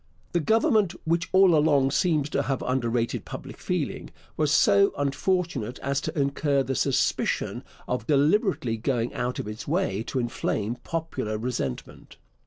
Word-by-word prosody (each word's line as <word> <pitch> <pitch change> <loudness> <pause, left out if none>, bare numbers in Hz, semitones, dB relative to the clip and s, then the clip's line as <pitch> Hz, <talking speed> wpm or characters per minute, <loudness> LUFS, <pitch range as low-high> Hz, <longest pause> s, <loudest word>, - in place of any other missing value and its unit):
The 175 - +1
Government, 220 - +2
which 170 +2 0
all 190 -2 +6
along 145 -3 +3
seems 155 -2 +1
to 140 - +1
have 135 0 -2
underrated 120 -2 -1
public - - -9
feeling, - - -3 0.3
was 150 -2 +1
so 200 +6 +4
unfortunate 145 - -1
as 140 0 0
to 150 - -3
incur 140 0 +1
the 135 - -2
suspicion 135 0 0 0.2
of 125 - -3
deliberately 150 - +2
going 120 0 -1
out 125 +1 -2
of - - -4
its 105 +2 -7
way 145 - 0
to - - -3
inflame 120 -2 -2
popular 135 -10 -3
resentment. 110 - -5
140 Hz, 145 wpm, -26 LUFS, 125-165 Hz, 0.3 s, all